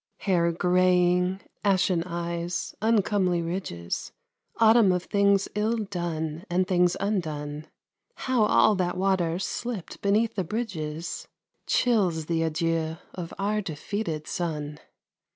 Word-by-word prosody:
Hair 170 -4 +2
greying, 180 +1 +3 0.2
ashen 185 -3 +2
eyes, 170 0 -3
uncomely 205 -5 +2
ridges, 165 - -4 0.5
Autumn 225 -3 +6
of 180 -1 0
things 200 -1 +2
ill 215 +3 0
done, 170 -6 -3
and 180 +1 +1
things 180 -1 +3
undone: 155 -7 -3 0.5
How 255 -4 +1
all 215 - +5
that 180 -1 -1
water, 185 -3 +1
slipped 210 +1 -4
beneath 215 +3 +2
the 190 - -1
bridges, 170 -6 -4 0.4
Chills 190 -10 +2
the 165 0 0
adieux 160 0 -1 0.2
of 175 -2 -6
our 210 +2 0
defeated 165 -1 -4
sun! 150 -3 -3
180 Hz, 115 wpm, -26 LUFS, 165-200 Hz, 0.5 s, Autumn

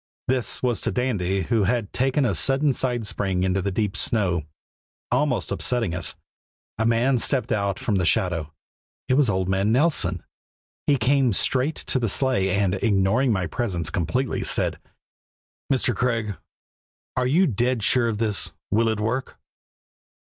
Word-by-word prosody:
This 130 -1 0
was 120 -2 0
to - - -1
Dandy, 100 -7 -1
who 110 +3 +1
had 110 0 -1
taken 135 +2 +1
a 115 - +1
sudden 135 - +2
side 120 -3 -1
spring 95 -3 -1
into 95 +1 +1
the 100 - -1
deep 100 -1 -1
snow, 90 -3 +1 0.7
almost 130 0 0
upsetting 115 -8 0
us. 90 0 -4 0.6
A 110 - +2
man 120 +3 +2
stepped 130 +2 0
out 100 -2 0
from 105 -4 -1
the 90 - 0
shadow. 80 -1 0 0.6
It - - +2
was 135 -3 +3
old 95 -2 0
man 95 +3 +1
Nelson. 120 - +1 0.6
He 145 - +4
came 130 0 +2
straight 130 +9 +2
to 130 - -1
the 115 -3 0
sleigh 125 -4 +2
and, 95 -1 +1
ignoring 110 +4 +2
my 95 -4 0
presence 85 -3 -2
completely, 120 +8 -1
said: - - +1 0.9
"Mr. 125 -3 +2
Craig, 115 -3 -1 0.8
are 125 -1 +1
you 170 +9 +4
dead 120 - 0
sure 120 +1 +3
of 110 - -2
this? 105 -2 -1 0.2
Will 115 +3 +2
it 110 -1 -1
work?" 115 +5 -2
115 Hz, 155 wpm, -24 LUFS, 95-125 Hz, 0.9 s, He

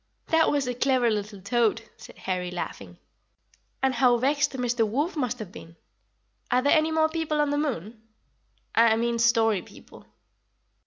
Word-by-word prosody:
"That 320 0 +4
was 285 -2 0
a 250 - -2
clever 250 -1 +2
little 205 -1 -4
toad," 225 +2 +1
said - - -14
Harry, 180 -1 -3
laughing; 100 - -7 0.9
"and 265 -1 +2
how 245 0 +4
vexed 280 +4 +1
Mr. 245 -2 0
Wolf 280 - -1
must 250 -5 -2
have 215 -6 -8
been! 165 -2 -12 0.7
Are 250 0 +2
there 285 - +4
any 310 0 +2
more 315 0 +3
people 315 -1 -2
on 295 -1 +1
the 290 - 0
moon 225 - -4 0.7
I 230 -1 +5
mean 235 +1 -1
story 225 -4 +3
people?" - - -16
240 Hz, 160 wpm, -26 LUFS, 220-285 Hz, 0.9 s, I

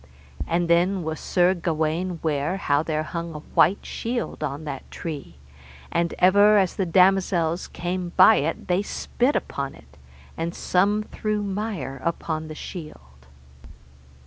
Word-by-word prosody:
And 170 +1 +1
then 175 +2 +2
was 160 0 -4
Sir 180 0 +2
Gawaine 165 0 -1
ware 155 +3 0
how 145 -6 +1
there 155 -1 -1
hung 170 0 -5
a - - -5
white 170 +4 +4
shield 235 -8 -4
on 145 +1 -3
that 140 -3 -7
tree, 145 - -7 0.6
and 170 0 0
ever 205 +3 +6
as 190 -3 +2
the 190 - -1
damosels 180 -2 +3
came 180 0 -4
by - - +8
it 155 +3 -2
they 180 +2 +2
spit 245 +5 -1
upon 140 -1 -3
it, 70 +2 -19 0.4
and 170 +2 -3
some 205 +4 +1
threw 215 0 -3
mire 195 -9 -4
upon 160 -1 -2
the 155 - -8
shield. 65 - -10
170 Hz, 145 wpm, -24 LUFS, 155-190 Hz, 0.6 s, by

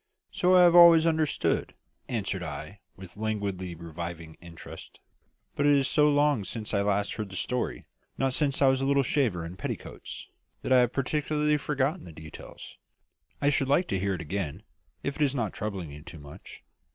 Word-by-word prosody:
"So 180 +1 +3
I 180 - +7
have 175 -1 +6
always 170 -2 +8
understood," 160 -2 0 0.3
answered 100 -5 -2
I, 80 +4 -7 0.2
with 95 +1 -12
languidly 100 -5 -3
reviving 85 0 -7
interest. 85 -2 -11 0.6
"But 145 - +1
it 145 - +6
is 135 -2 +2
so 150 0 +4
long 145 -5 +2
since 110 +2 -5
I 100 - +2
last 100 0 0
heard 105 -2 -5
the 95 - -9
story 125 +6 -3 0.3
not 135 -1 0
since 140 -1 +1
I - - +6
was 130 0 +3
a - - 0
little 140 0 +3
shaver 115 - 0
in 85 +2 -9
petticoats - - -7 0.4
that - - -3
I 130 - +7
have 125 -1 +3
practically 150 +2 0
forgotten 150 +3 -1
the 85 - -10
details. 80 -1 -11 0.6
I 145 0 +3
should 135 -1 +1
like 170 +6 +2
to 95 - 0
hear 95 0 -1
it 85 - -6
again, 80 -2 -4 0.4
if 140 - -3
it - - -5
is 140 -1 +1
not 110 -7 -2
troubling 95 -7 -5
you 75 +1 -10
too 80 - -11
much." 70 -1 -12
110 Hz, 190 wpm, -28 LUFS, 90-145 Hz, 0.6 s, always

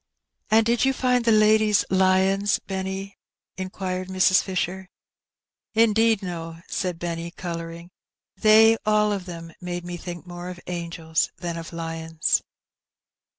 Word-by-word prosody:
'' - - -57
" - - -44
And 220 +1 +5
did 235 +1 +2
you 270 0 +3
find 250 -2 +1
the 230 - +4
ladies 215 -1 +4
lions, 190 +1 +3
Benny? 190 +1 -5 0.2
*' - - -68
inquired 185 0 -4
Mrs. 185 0 +4
Fisher. 190 0 -3 0.9
''Indeed 225 -1 +3
no,'' 165 -2 -6
said 180 -3 -2
Benny, 170 0 -4
colouring; 170 -1 -7 0.4
"they 220 +3 +6
all 210 0 +3
of 195 -3 -3
them 165 -2 -8
made 175 -1 -5
me 175 0 -5
think 175 0 -8
more 175 0 -7
of 180 -1 -8
angels 170 -2 -2
than 170 -1 -4
of 165 0 -7
lions." 165 -1 -1
185 Hz, 145 wpm, -24 LUFS, 170-210 Hz, 0.9 s, they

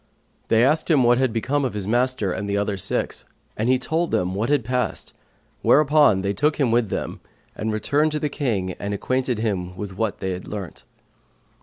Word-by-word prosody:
They 115 +2 +4
asked 155 +5 +1
him 145 -6 +4
what 120 +1 +4
was 130 - +3
become 130 +5 -1
of 125 -5 -2
his 100 -2 -3
master 120 -3 +1
and 100 +3 -4
the 100 - 0
other 100 0 0
six, 95 - -1 0.3
and 110 +3 -1
he 130 - +4
told 160 +6 -1
them 90 0 0
what 105 +6 -1
had 145 -6 +2
passed 125 +1 -2 0.5
whereupon 145 -8 +4
they 100 0 0
took 150 +9 +1
him 135 -6 +1
with 115 -3 +2
them - - -4 0.4
and 110 +1 -2
returned 145 +8 +1
to 150 - -1
the 150 - 0
King 115 -11 -2
and 100 0 -3
acquainted 130 +3 -1
him 95 -5 -2
with 100 -2 -6
what 110 -1 -1
they 95 -1 -3
had 90 0 -6
learnt. 100 -4 -7
115 Hz, 200 wpm, -23 LUFS, 100-135 Hz, 0.5 s, They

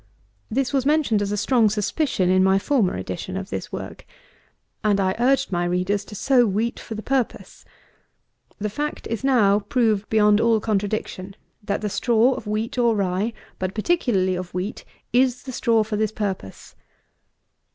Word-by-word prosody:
This 265 +3 -1
was 270 -2 +2
mentioned 280 -7 +2
as 200 0 -2
a 210 - -1
strong 225 +1 +3
suspicion 210 - 0
in 185 0 +4
my 190 0 +4
former 215 -2 +1
edition 95 - -5
of 195 +1 -6
this - - -5
work. - - -7 0.8
And 205 -2 +2
I 190 -1 +1
urged 270 +1 +2
my 175 -1 0
readers 180 +3 0
to 210 - -10
sow 250 +1 +3
wheat 215 +4 -1
for 225 - -7
the 215 - -6
purpose. 265 -3 -2 0.9
The 210 0 -3
fact 295 +6 -4
is 230 +2 -4
now 215 -7 +4
proved 215 -1 0
beyond 210 -1 +4
all 230 -1 +3
contradiction, 200 -2 -3 0.3
that 200 0 -2
the 210 - -1
straw 235 +4 +3
of 225 - -7
wheat 215 +4 -2
or 235 -2 +3
rye, 195 +2 0 0.3
but 185 +1 -3
particularly 215 - +1
of 180 -1 -5
wheat, 185 +4 -4 0.3
is 250 0 +2
the 265 - -6
straw 230 -3 +2
for 215 0 -3
this 215 0 0
purpose. 195 - -5
215 Hz, 170 wpm, -23 LUFS, 195-240 Hz, 0.9 s, in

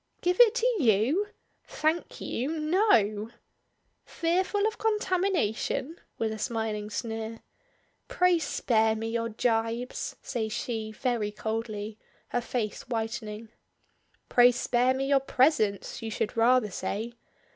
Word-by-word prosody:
"Give 360 +1 +1
it 470 -2 +7
to - - 0
you! 255 - +3 0.4
Thank 315 +3 -1
you. 250 - -3
No." 235 - +2 0.7
"Fearful 370 +4 0
of 440 +1 -1
contamination?" 370 - 0 0.2
with 225 -1 -1
a 220 - -7
smiling 220 -2 -2
sneer. 225 +2 -4 0.7
"Pray 360 -8 +3
spare 220 -7 +1
me 225 +1 -3
your 230 0 -1
jibes," 230 +1 -1
says 220 -3 -3
she 225 -2 -3
very 230 -2 -1
coldly, 215 0 -4 0.3
her 245 - 0
face 235 -3 -3
whitening. 225 -1 -4 0.8
"Pray 245 0 +6
spare 245 +1 +1
me 270 +1 -1
your 275 0 +4
presence, 260 -7 +1
you 225 - -4
should 210 -1 -2
rather 230 -2 +4
say. 210 +6 -3
235 Hz, 120 wpm, -28 LUFS, 220-305 Hz, 0.8 s, it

